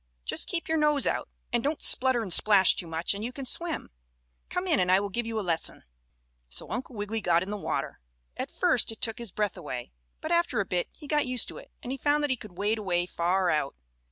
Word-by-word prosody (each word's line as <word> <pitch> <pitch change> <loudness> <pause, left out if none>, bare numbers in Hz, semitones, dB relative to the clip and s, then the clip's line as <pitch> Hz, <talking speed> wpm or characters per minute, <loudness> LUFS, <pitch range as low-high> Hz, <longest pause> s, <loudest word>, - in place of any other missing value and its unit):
Just - - +1
keep 335 -3 0
your 320 0 +1
nose 300 -2 +3
out, - - -1 0.2
and 240 -1 +1
don't 295 +2 -1
splutter 255 -2 +5
and 190 -5 +2
splash 200 -2 +6
too 175 - -4
much 165 +3 -1
and 200 +1 -6
you 240 - -3
can 270 +1 -7
swim. 335 +5 0 0.6
Come 360 - -2
in 330 -6 +2
and 180 0 +2
I 190 - +6
will 200 0 -3
give 235 +3 -2
you 225 -1 -2
a 205 - -4
lesson." 165 -2 -1 0.7
So - - -3
Uncle 250 +3 -5
Wiggily 210 +2 -3
got 175 -2 +2
in 195 - -6
the - - -2
water. 205 - -3 0.4
At - - -4
first - - +2
it 225 - -10
took 225 +1 -2
his 235 -5 -4
breath 210 -1 -1
away, 130 - -6 0.3
but 315 - -5
after 340 -9 +2
a 200 - 0
bit 180 -2 -2
he 305 - -13
got 295 -1 +1
used 250 -2 +3
to - - -8
it, - - -15
and 245 - -5
he 270 - -4
found 295 +2 +2
that 290 - 0
he - - +2
could 210 -7 -13
wade 210 +3 0
away 175 -4 0
far 180 +1 0
out. 145 -2 -1
220 Hz, 245 wpm, -28 LUFS, 185-270 Hz, 0.7 s, splash